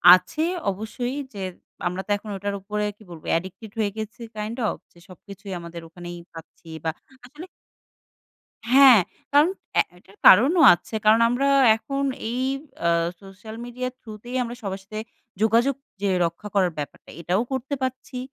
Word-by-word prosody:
আছে 185 +12 -2 0.3
অবশ্যই 240 +6 -4 0.2
যে 200 - -6 0.5
আমরা 180 +2 -2
তো - - -25
এখন 210 +1 -11
ওটার 200 +1 -3
উপরে 210 +1 -2
কি - - -17
বলবো 160 -2 -11
addicted 190 +4 -8
হয়ে 205 -2 +1
গেছি 220 +2 -6 0.2
kind 215 +3 -4
of। - - -1 0.2
যে - - -24
সবকিছুই 200 +2 -10
আমাদের 170 0 -8
ওখানেই 175 +1 -9 0.2
পাচ্ছি 165 0 -13
বা 160 - 0 0.3
আসলে 300 +8 -10 1.3
হ্যাঁ, 265 -5 +9 0.3
কারণ 295 +4 +6 0.3
এ - - +8 0.2
এটার 195 +2 -21
কারণও 285 - +8
আছে। 175 - -11
কারণ 220 +2 +6
আমরা 245 +4 +1 0.3
এখন 275 +4 -3 0.3
এই 250 +2 -1 0.4
আ - - +4 0.3
social 195 +3 -10
media 250 +1 -4
through 220 -4 -10
তেই 250 +1 -4
আমরা 240 0 -5
সবার 195 -1 -4
সাথে 215 +1 -5 0.4
যোগাযোগ 235 +5 +3 0.3
যে 200 - +2 0.2
রক্ষা 170 +5 -4
করার 185 -4 +3
ব্যাপারটা 145 - -7
এটাও 180 +6 +1
করতে 265 +2 -2
পারছি, 260 0 -4
215 Hz, 155 wpm, -24 LUFS, 190-245 Hz, 1.3 s, হ্যাঁ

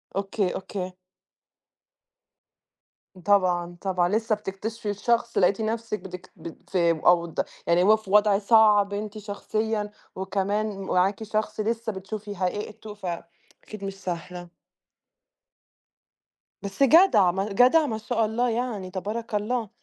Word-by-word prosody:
أوكي، 195 -1 -1
أوكي. 185 -1 -5 2.3
طبعًا، 175 -3 +2
طبعًا 180 -2 +1
لسة 220 +2 +1
بتكتشفي 210 +2 -5
الشخص 235 +3 0
لقيتِ 195 +3 +3
نفسك 225 0 -2
بتكت 180 -1 -10
بت 170 +2 -11
آآ، 170 -3 +2
أوض 170 -2 +3 0.3
يعني 170 +1 +4
هو 215 +3 +6
في 215 -3 -11
وضع 210 -1 +5
صعب 210 -2 +5
أنتِ 210 +1 -5
شخصيًا 210 +1 -3 0.2
وكمان 195 +2 -2
معاكِ 190 +3 +1
شخص 215 0 -2
لسة 225 +1 -1
بتشوفي 205 +1 -7
حقيقته، 210 +3 -4
فأكيد 180 +2 -9
مش 195 0 -4
سهلة. 175 0 -5 2.1
بس 200 +6 -1
جدعة، 270 - +6
ما 195 +3 -2
جدعة، 255 +9 +5
ما 225 -6 -2
شاء 225 +1 0
الله 235 +3 0
يعني، 225 -5 -3
تبارك 210 +4 -4
الله. 220 +1 -1
205 Hz, 120 wpm, -25 LUFS, 190-220 Hz, 2.3 s, هو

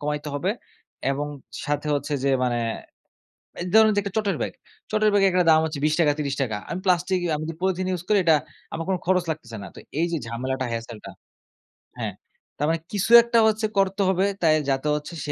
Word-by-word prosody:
কমাইতে 150 0 -3
হবে 175 +7 0 0.6
এবং 145 +2 -2 0.4
সাথে 145 0 -1
হচ্ছে 145 +1 -3
যে - - +3 0.2
মানে 120 -1 0 1.0
এই 180 - -4
ধরুন 220 0 +7
যে - - +4
একটা 200 -1 -6
চটের 205 -2 0
ব্যাগ। - - -2 0.4
চটের 215 0 +3
ব্যাগে 195 -1 +4
একটা 180 -1 +2
দাম 160 0 +6
হচ্ছে 155 -2 -3
৳২০-৳৩০। 145 -6 +1
আমি 175 +2 -3
প্লাস্টিক 180 0 +2
আমি 155 +1 -3
যে - - -7
পলিথিন 185 0 0
ইউস 180 -2 -2
করি 210 - +4
এটা 160 -2 +6 0.4
আমার 165 0 -3
কোনো 185 -2 +1
খরচ 185 -1 +2
লাগতেছে 120 -8 -6
না। - - -7
তো - - -12 0.2
এই 170 - +2
যে - - +1
ঝামেলাটা 130 +3 -3
হেছেলটা। 115 -1 -6 0.9
হ্যাঁ, - - -3 0.4
তার 150 - 0
মানে 165 - +1
কিছু 205 +2 -1
একটা 235 -1 +2
হচ্ছে 220 0 +1
করতে 195 +1 +2
হবে। 190 +1 +2 0.2
তাই 155 -2 +4
যাতে 135 +2 0
হচ্ছে 150 +3 -6
সে 145 - -2
165 Hz, 190 wpm, -24 LUFS, 145-190 Hz, 1.0 s, ধরুন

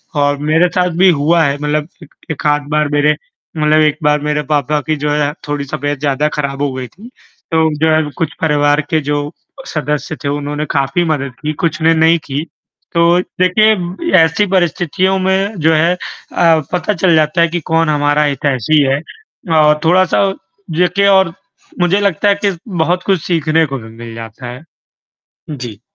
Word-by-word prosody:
और 145 0 +1
मेरे 155 +5 +2
साथ 180 0 0
भी 190 +1 +5
हुआ 165 +1 +2
है, 140 -2 +1
मतलब 150 +1 -2 0.2
एक 145 - -17 0.2
1 155 - -6
आध 145 0 +2
बार 150 0 +1
मेरे 145 +1 +3 0.4
मतलब 155 0 +3
1 150 -1 +2
बार 150 0 +3
मेरे 150 0 -1
पापा 150 0 +1
की 155 - +1
जो 150 - 0
है 145 0 +1 0.2
थोड़ी 145 -1 -3
तबीयत 145 -2 -3
ज़्यादा 145 +1 0
ख़राब 140 -1 -3
हो 145 -2 0
गई 130 -1 -5
थी, 205 - -15 0.4
तो 160 -1 +3
जो 160 - +4
है 155 0 +3
कुछ 165 -4 -2
परिवार 145 -1 +2
के 160 - +2
जो 145 +1 -2 0.4
सदस्य 150 0 -3
थे - - -2
उन्होंने 145 +1 -3
काफ़ी 140 +4 0
मदद 140 -4 -2
की, 155 0 -2
कुछ 160 -1 -2
ने 165 +1 +4
नहीं 160 +1 +4
की। 140 +2 -3 0.5
तो 170 +1 +4 0.2
देखिए, 190 - +1
ऐसी 165 +5 +3
परिस्थितियों 185 0 0
में 190 +2 0
जो 160 +1 +3
है 165 +3 +3
अ, - - -17 0.8
पता 180 +4 0
चल 175 -2 +2
जाता 155 +2 +2
है 170 - +5
कि 175 +1 -3
कौन 165 0 +2
हमारा 145 0 +2
हितैषी 140 0 +1
है 135 +1 0 0.6
और 150 0 +4
थोड़ा-सा 185 +3 +3 0.5
देखिए 180 +3 +2
और 190 -4 +4 0.5
मुझे 175 +3 +3
लगता 200 0 +1
है 200 - +3
कि 195 -3 0
बहुत 180 -1 -1
कुछ 190 -4 +1
सीखने 160 -1 +1
को 140 -2 -4
भी 110 -1 -11
मिल 115 0 -10
जाता 115 +2 -9
है। 125 +5 -9 0.9
जी। 120 -8 -7
155 Hz, 180 wpm, -15 LUFS, 145-175 Hz, 0.9 s, भी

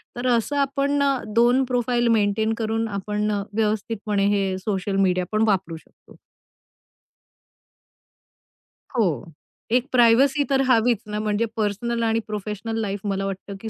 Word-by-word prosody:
तर 245 +1 -3
असं 245 +3 +1
आपण 280 +1 0 0.3
दोन 245 +3 +4
प्रोफाइल 245 -1 0
मेंटेन 215 +2 +1
करून 225 0 -1
आपण 210 +1 -2
अ, 200 -1 -1
व्यवस्थितपणे 210 -1 -1
हे 190 -1 -1
सोशल 195 0 -2
मीडिया 180 0 +1
पण 215 +1 +2
वापरू 190 -5 0
शकतो. - - -20 2.8
हो. 225 -4 +3 0.7
एक 250 +2 +2
प्रायव्हसी 260 +4 +4
तर 270 -1 +2
हवीच 235 -1 +4
ना, 210 0 -3
म्हणजे 215 +1 0
पर्सनल 230 +3 -1
आणि 225 0 +1
प्रोफेशनल 215 +1 -4
लाईफ 200 -1 -3
मला 195 0 -1
वाटतं, 195 +1 -6
की 220 - -5
220 Hz, 130 wpm, -23 LUFS, 205-240 Hz, 2.8 s, दोन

